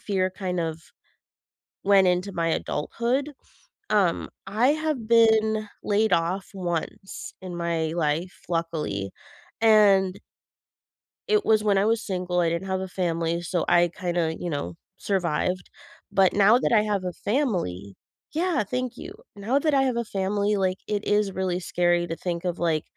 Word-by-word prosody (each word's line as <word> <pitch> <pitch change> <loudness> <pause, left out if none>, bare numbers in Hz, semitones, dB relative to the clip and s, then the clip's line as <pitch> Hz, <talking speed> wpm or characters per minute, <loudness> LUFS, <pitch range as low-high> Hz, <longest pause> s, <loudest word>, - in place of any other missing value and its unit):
fear 185 -2 0
kind 185 -1 -4
of 160 -1 -3 1.0
went 195 -1 +5
into 180 +2 +1
my 165 -1 0
adulthood. 240 - -1 0.6
Um, 195 -5 +2 0.2
I 215 +6 +2
have 305 -5 0
been 220 -2 +4
laid 210 -1 +1
off 175 +4 -1
once 175 +1 -5
in 180 -2 -6
my 165 -2 -1
life, 165 +2 -1
luckily, 155 - -2 0.5
and 200 -4 +5 1.1
it 425 -1 +2
was 215 -1 +3
when 205 -2 +3
I 195 - +3
was 225 0 +2
single, 180 -2 -1
I 170 - +3
didn't 170 +3 -3
have 190 - 0
a 190 - -4
family, 170 -2 -1
so, 175 -1 -1
I 175 0 +4
kinda, 175 -3 -1
you 175 - -3
know, 145 - -3 0.2
survived. 180 -1 -1 0.4
But 190 -1 +4
now 205 +3 +6
that - - 0
I 210 -2 +5
have 205 -3 -1
a 180 - -2
family 175 - -2 0.4
Yeah, 330 -6 +1
thank 250 +3 -3
you. 380 - -8 0.2
Now 220 +7 0
that 305 +1 +1
I 270 -1 +4
have 260 -2 0
a 235 - 0
family, 205 +1 0
like, 185 -1 0
it 210 0 -2
is 205 -1 +2
really 185 -1 -1
scary 175 -1 +1
to 165 - -3
think 175 -1 -4
of, 175 -1 -2
like 160 -3 +1
190 Hz, 160 wpm, -25 LUFS, 175-215 Hz, 1.1 s, now